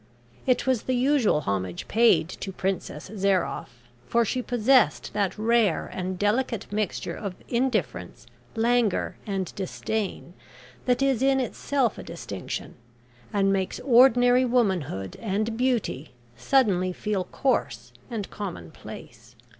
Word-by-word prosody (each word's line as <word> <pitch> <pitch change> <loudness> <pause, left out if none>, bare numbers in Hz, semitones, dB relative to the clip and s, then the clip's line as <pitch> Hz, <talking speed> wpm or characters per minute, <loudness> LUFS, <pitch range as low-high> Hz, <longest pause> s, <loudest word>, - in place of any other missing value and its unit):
It 255 - +2
was 260 -4 +2
the 255 - -1
usual 250 - +3
homage 95 - -3
paid 225 -7 +4
to 190 +2 -6
Princess 185 -4 -3
Zairoff, 180 - -1 0.2
for 235 0 +2
she 250 +4 -1
possessed 245 +2 +2
that 200 -1 0
rare 220 -5 +2
and 185 0 -3
delicate 220 +3 0
mixture 210 -3 -2
of 200 -4 -5
indifference, 250 +1 -1 0.3
languor, 230 -2 +1
and 195 -3 -2
disdain 195 -1 -4 0.5
that 250 +1 +2
is 270 -3 +2
in 270 0 +3
itself 260 -1 -1
a - - -7
distinction, 100 - -6 0.6
and 195 -1 +2
makes 190 -1 -1
ordinary 245 0 +5
womanhood 190 - 0
and 215 +1 -1
beauty 235 - -1 0.2
suddenly 185 - +2
feel 195 -1 -2
coarse 265 +8 -1 0.2
and 220 -5 -4
commonplace. 175 - -9
215 Hz, 120 wpm, -26 LUFS, 185-245 Hz, 0.6 s, ordinary